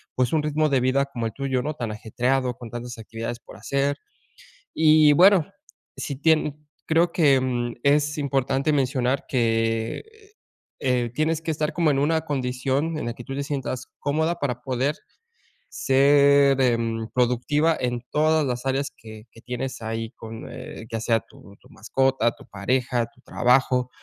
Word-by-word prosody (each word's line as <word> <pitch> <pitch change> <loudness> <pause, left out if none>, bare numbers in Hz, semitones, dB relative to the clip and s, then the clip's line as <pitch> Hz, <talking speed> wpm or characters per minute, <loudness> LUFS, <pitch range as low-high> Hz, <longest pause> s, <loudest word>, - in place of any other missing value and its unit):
pues, 125 +3 +1
un 155 - +2
ritmo 155 +1 +1
de 135 -2 +3
vida 130 +2 +2
como 120 -4 -5
el 110 - -7
tuyo, 135 -2 -1
¿no?, 150 +3 -3
tan 120 -6 -4
ajetreado 125 +4 -1
con 120 - -9
tantas 120 +1 -7
actividades 115 +1 -6
por 100 - -14
hacer, 140 +5 -1 0.8
y 155 -1 +6
bueno, 180 0 +6 0.5
si 140 - -4
tien 150 0 +1 0.2
creo 170 +2 +3
que, 145 -5 +4
em, 120 -2 -1
es 145 +1 +2
importante 140 0 0
mencionar 130 -1 0
que, 115 -2 0 0.8
eh, 125 -3 0
tienes 155 +2 0
que 165 - -3
estar 150 -1 -1
como 165 -3 +2
en 135 - +1
una 160 +3 +1
condición 135 +3 -1
en - - -4
la 120 - -2
que 120 - -10
tú 135 - -6
te 140 - -2
sientas 135 -3 -4
cómoda 160 +4 0
para 125 -5 -3
poder 130 +3 -1 0.7
ser, 140 0 +4
em, 115 -2 0
productiva 125 +6 +2
en 120 -1 -2
todas 155 0 +2
las 125 0 -3
áreas 135 +1 -1
que 110 -1 -12
que 115 - -16
tienes 125 +2 -5
ahí, 115 0 -4
con, 115 0 -9
eh, 115 - -9
ya 115 - -3
sea 115 0 +2
tu 100 -3 -17
tu - - -21
mascota, 130 +1 +1
tu - - -16
pareja, 120 +3 -1
tu 120 - -27
trabajo, 125 0 +2
130 Hz, 165 wpm, -24 LUFS, 120-145 Hz, 0.8 s, y